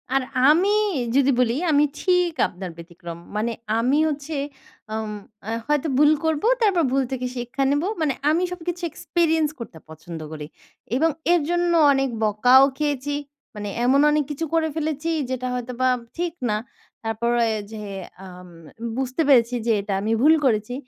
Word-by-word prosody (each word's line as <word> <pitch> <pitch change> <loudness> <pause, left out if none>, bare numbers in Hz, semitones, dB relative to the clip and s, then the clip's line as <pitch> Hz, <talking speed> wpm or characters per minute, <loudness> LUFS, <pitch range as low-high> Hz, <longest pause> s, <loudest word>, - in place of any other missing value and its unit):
আর 270 - +3 0.3
আমি 375 +7 +4 0.4
যদি 275 0 +4
বলি 240 -1 +2 0.2
আমি 295 0 +4 0.2
ঠিক 360 -2 +2
আপনার 180 0 -8
ব্যতিক্রম। 170 0 -9 0.2
মানে 230 +2 0 0.3
আমি 255 +5 +2
হচ্ছে 295 +1 -5 0.6
আম 220 -1 -3 0.3
অ্যা 220 +2 -4
হয়তো 295 +1 +1
ভুল 295 +1 +6
করব, 315 0 0 0.2
তারপর 380 -6 +3
ভুল 270 0 +2
থেকে 255 -1 -3
শিক্ষা 245 +3 -2
নেব। 290 +3 +1 0.2
মানে 290 -4 +1 0.2
আমি 335 +4 +2
সবকিছু 350 0 -5
এক্সপেরিয়েন্স 320 -1 +1
করতে 205 -8 -8
পছন্দ 160 +1 -9
করি। 150 -1 -7 0.5
এবং 325 +5 +3 0.2
এর 345 - +3
জন্য 350 0 +1 0.2
অনেক 270 -1 +1
বকাও 245 +6 +5
খেয়েছি। 290 -1 -1 0.4
মানে 205 -1 -5 0.2
এমন 275 +3 +4
অনেক 300 0 +2
কিছু 325 +3 -3
করে 325 -1 +2
ফেলেছি 315 +1 -2 0.2
যেটা 255 -1 -3
হয়তো 250 0 -4
বা 255 - +4 0.3
ঠিক 345 -1 -2 0.2
না। 210 - +1 0.5
তারপরে 235 +1 0 0.2
যে 215 -1 -7 0.5
আম 180 0 -12 0.5
বুঝতে 265 +4 -1
পেরেছি 245 -3 +4
যে 230 - +2
এটা 200 0 -4
আমি 220 +2 -1
ভুল 310 +3 +6
করেছি। 220 0 +1
270 Hz, 160 wpm, -23 LUFS, 230-315 Hz, 0.6 s, ভুল